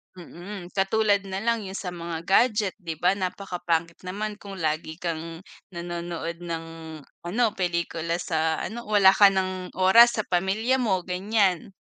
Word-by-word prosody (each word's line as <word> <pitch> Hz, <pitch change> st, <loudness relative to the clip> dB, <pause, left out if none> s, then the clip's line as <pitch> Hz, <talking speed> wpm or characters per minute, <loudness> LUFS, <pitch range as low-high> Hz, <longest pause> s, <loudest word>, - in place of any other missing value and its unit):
Mm, 180 Hz, +1 st, -9 dB
katulad 200 Hz, 0 st, +1 dB
nalang 210 Hz, +2 st, -1 dB
'yung 190 Hz, -, -7 dB
sa 185 Hz, -2 st, -4 dB
mga 170 Hz, -1 st, -6 dB
gadget. 210 Hz, +1 st, +3 dB
'Di 165 Hz, -4 st, -5 dB
ba, 175 Hz, +4 st, +2 dB
napakapangit 175 Hz, -3 st, -2 dB
naman 210 Hz, +3 st, -4 dB
kung 200 Hz, -1 st, -9 dB
lagi 160 Hz, -2 st, -2 dB
kang 165 Hz, 0 st, -5 dB, 0.3 s
nanonood 170 Hz, -1 st, -5 dB
ng, 165 Hz, -2 st, -5 dB, 0.6 s
ano, 220 Hz, +8 st, +1 dB
pelikula 170 Hz, -2 st, -2 dB
sa 160 Hz, -2 st, 0 dB
ano, 235 Hz, +3 st, -6 dB
wala 205 Hz, -3 st, +6 dB
ka 200 Hz, +1 st, +7 dB
nang 185 Hz, -1 st, -1 dB
oras 230 Hz, +6 st, +6 dB
sa 215 Hz, -, -1 dB
pamilya 200 Hz, +9 st, +1 dB
mo, 195 Hz, -7 st, +1 dB
ganyan. 190 Hz, 0 st, 0 dB
185 Hz, 140 wpm, -25 LUFS, 170-200 Hz, 0.6 s, ka